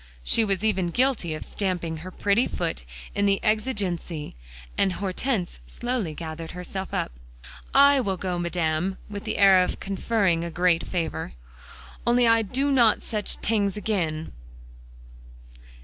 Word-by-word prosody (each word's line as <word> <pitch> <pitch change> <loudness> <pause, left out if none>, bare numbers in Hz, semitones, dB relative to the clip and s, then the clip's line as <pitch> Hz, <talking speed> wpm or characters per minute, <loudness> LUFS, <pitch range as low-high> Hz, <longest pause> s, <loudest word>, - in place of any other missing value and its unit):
She 225 - +3
was 200 -1 0
even 190 -5 +1
guilty 220 -5 +1
of - - -7
stamping 175 -5 -2
her 170 +4 -8
pretty 200 +5 +1
foot 165 - -3 0.3
in 200 0 +1
the 195 0 +3
exigency, 200 - -1 0.4
and 190 -2 +2
Hortense 195 - -2
slowly 220 - -3
gathered 160 0 -6
herself 185 +2 -5
up. - - -1 0.6
"I 280 0 +6
will 195 -6 -1
go, 180 -1 -2
Madame," 175 +1 0
with 205 -1 -6
the - - -2
air 195 -2 +7
of - - -3
conferring 195 -3 0
a 170 - -3
great 175 0 +2
favor, 165 -2 -3 0.7
"only 240 0 +4
I 230 0 +5
do 265 +7 0
not 235 -5 +4
such 210 -2 -3
t'ings 205 -3 +1
again." 170 -7 -2
190 Hz, 140 wpm, -25 LUFS, 170-220 Hz, 0.7 s, air